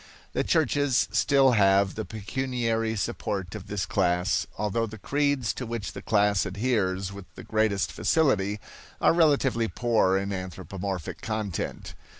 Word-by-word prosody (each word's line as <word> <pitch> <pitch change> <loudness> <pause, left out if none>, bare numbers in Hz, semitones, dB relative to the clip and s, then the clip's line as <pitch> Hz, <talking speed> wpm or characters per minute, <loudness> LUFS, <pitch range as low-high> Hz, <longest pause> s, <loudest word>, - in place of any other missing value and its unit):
The - - +1
churches 145 -5 +2
still 135 -2 +4
have 100 -3 +4
the 110 - -4
pecuniary 115 +2 -2
support 95 -3 -3
of 105 -4 -8
this 100 -2 -2
class; 90 0 +1
although 105 +2 0
the 110 +1 -9
creeds 140 +1 0
to 125 - -5
which 115 -3 -4
the - - -8
class 105 -2 +2
adheres 100 -2 -1
with 100 -1 -9
the - - -9
greatest 110 -2 0
facility 105 -10 +1 0.4
are - - +4
relatively 140 -8 +3
poor 110 -5 +2
in 100 +1 -2
anthropomorphic 95 0 -5
content. 110 -6 -4
105 Hz, 140 wpm, -27 LUFS, 95-120 Hz, 0.4 s, still